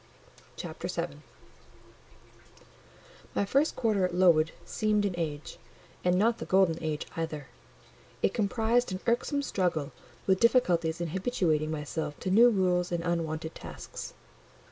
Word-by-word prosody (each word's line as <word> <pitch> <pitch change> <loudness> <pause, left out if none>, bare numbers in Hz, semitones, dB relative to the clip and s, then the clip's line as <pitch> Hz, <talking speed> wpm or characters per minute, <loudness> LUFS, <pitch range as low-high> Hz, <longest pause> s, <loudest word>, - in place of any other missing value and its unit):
CHAPTER - - -6
VII - - -3 2.2
My 200 - +2
first 275 +9 +2
quarter 215 -5 +1
at 180 -1 0
Lowood 165 -3 +4
seemed 210 -1 +1
an 195 - 0
age; 155 -3 -4 0.4
and 180 0 +3
not 225 +4 +2
the - - -5
golden 185 -4 +3
age 155 -2 -2
either; 160 -3 -4 0.8
it - - +3
comprised 225 +2 +1
an 185 - -3
irksome 250 +5 +1
struggle 170 - -1 0.3
with 190 -1 +3
difficulties 175 -9 +3
in 170 - -2
habituating 170 -5 0
myself 150 0 -4
to 185 - -2
new 235 +5 +7
rules 180 -4 +1
and 170 -1 -1
unwonted 165 -2 -2
tasks. - - -8
180 Hz, 130 wpm, -29 LUFS, 160-210 Hz, 2.2 s, new